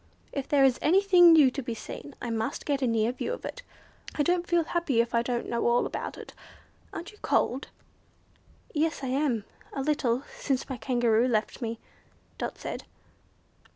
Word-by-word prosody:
If 275 -2 -4
there 285 -2 +4
is 265 -2 +4
anything 360 0 +6
new 300 -5 +7
to 275 - -4
be 235 -2 -4
seen, 280 +5 -8
I 240 - -4
must 225 +4 -2
get 280 -2 0
a 260 - +2
near 225 0 +2
view 360 - -3
of - - -7
it. - - -6 0.5
I 295 - +2
don't 350 +2 +1
feel 345 -1 +3
happy 325 -7 0
if 235 0 +1
I 235 - +3
don't 240 0 -2
know 235 0 0
all 240 +1 +3
about - - -5
it. - - -10 0.6
Aren't 345 - -7
you 420 - -20
cold?" 260 +3 +1 1.1
"Yes, 315 -2 0
I 260 - -2
am, 255 -6 0 0.3
a 270 - -2
little, 265 -4 +1 0.2
since 270 -3 -1
my 265 - -4
Kangaroo 240 -1 +2
left 220 +1 -1
me," 230 -1 -3 0.6
Dot - - -4
said. - - -6
265 Hz, 185 wpm, -28 LUFS, 235-305 Hz, 1.1 s, new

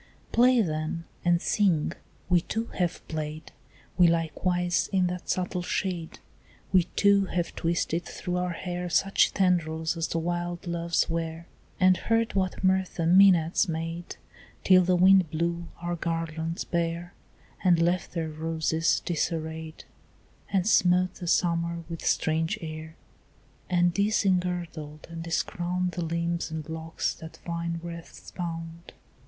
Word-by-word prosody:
Play 245 0 +5
then 155 -2 -2 0.2
and 175 -1 +3
sing; 175 -6 +2 0.4
we 180 -2 +4
too 225 +6 -3
have 175 -1 -1
played, 155 0 -5 0.5
We 175 - +8
likewise, 175 +2 0
in 190 -2 +3
that 180 0 -4
subtle 180 -1 -1
shade. 175 -2 -3 0.6
We 180 -2 +5
too 200 -1 +4
have 175 -2 -2
twisted 170 0 -1
through 180 0 -4
our 180 -1 -1
hair 180 0 -4
Such 195 +4 +3
tendrils 160 -4 +1
as 165 0 -1
the - - -2
wild 175 +2 -2
Loves 170 -1 0
wear, 165 0 -3 0.3
And 185 -1 +5
heard 225 0 +1
what 190 0 -1
mirth 190 0 +2
the 170 - -1
Mænads 180 0 +5
made, 165 +1 -4 0.5
Till 185 -1 +7
the 180 +1 +3
wind 185 -1 +6
blew 170 +2 -2
our 175 0 -2
garlands 165 0 -3
bare 170 +1 -2 0.5
And 175 -3 +5
left 175 +1 +1
their 165 -2 -2
roses 160 +1 0
disarrayed, 160 -1 -3 0.7
And 190 -2 +2
smote 180 -3 +4
the 175 - -8
summer 170 0 +1
with 165 -1 -7
strange 160 +1 +1
air, 160 0 -7 0.7
And 175 -1 +3
disengirdled 180 -7 0
and 165 0 -6
discrowned 175 +2 -1
The 175 - -3
limbs 170 +1 -1
and 160 -1 -5
locks 160 0 -3
that 160 0 -11
vine 170 0 -3
wreaths 170 -1 -9
bound. 165 -1 -6
170 Hz, 135 wpm, -27 LUFS, 165-180 Hz, 0.7 s, We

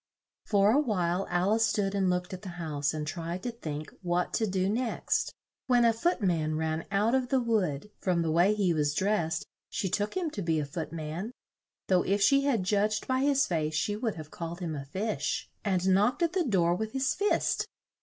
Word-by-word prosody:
For 205 0 +4
a 270 - +4
while 190 - 0
Al 180 +4 +2
ice 225 0 +3
stood 205 -2 0
and 195 -2 +2
looked 180 +1 -1
at 185 - -6
the 195 - -7
house 150 -4 -1
and 155 -1 -3
tried 170 +3 -4
to 245 - -2
think 155 -9 -6
what 175 -1 0
to 220 - +1
do 190 -1 0
next, 230 +4 0 0.4
when 245 -2 +4
a 230 - +5
foot 245 - 0
man 160 -4 +1
ran 160 +1 -1
out 205 +4 +2
of 260 -2 +1
the 265 - +3
wood 210 - 0
(from 175 -3 +1
the 160 - 0
way 175 +6 +4
he 195 -5 +2
was 150 -2 0
dressed, 190 -4 0 0.2
she 190 - -2
took 205 - -1
him 345 -4 -1
to 205 - -4
be 165 -3 +1
a 150 - -1
foot 155 +3 -5
man; 165 +5 -4 0.6
though 185 -2 +4
if 200 +2 +1
she 275 +8 +4
had 240 -9 +2
judged 210 +2 +1
by 260 0 +1
his 275 0 +3
face 155 -3 -1
she 205 +7 0
would 220 0 -2
have 155 -2 -9
called 170 +1 -6
him 170 -4 -3
a 140 -2 -5
fish) 200 +9 -2 0.2
and 185 -3 +1
knocked 210 - +3
at 335 0 +1
the 365 -3 +1
door 175 -8 +3
with 220 +4 -3
his 265 -1 +1
fist. 410 +1 +1
190 Hz, 215 wpm, -29 LUFS, 170-225 Hz, 0.6 s, a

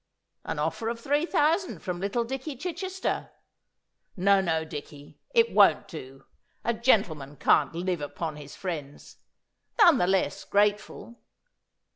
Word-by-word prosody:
An - - -3
offer 165 +9 -2
of 230 0 -4
three 290 +7 0
thousand 335 +2 +1
from 180 -1 -3
little 200 +5 -1
Dicky 270 +4 -5
Chichester. 370 +6 -3 0.9
No, 195 +1 +4
no, 160 -3 0
Dicky, 145 -1 -10
it 465 -1 +3
won't - - +5
do. 135 -4 -10 0.4
A 235 - +2
gentleman 180 - +1
can't 145 +1 +3
live 175 -1 -2
upon 150 +2 -4
his 145 -1 -10
friends. 150 -7 -7 0.6
None 335 -7 +7
the 180 - +2
less 190 0 0
grateful. 210 +3 0
195 Hz, 130 wpm, -27 LUFS, 155-265 Hz, 0.9 s, None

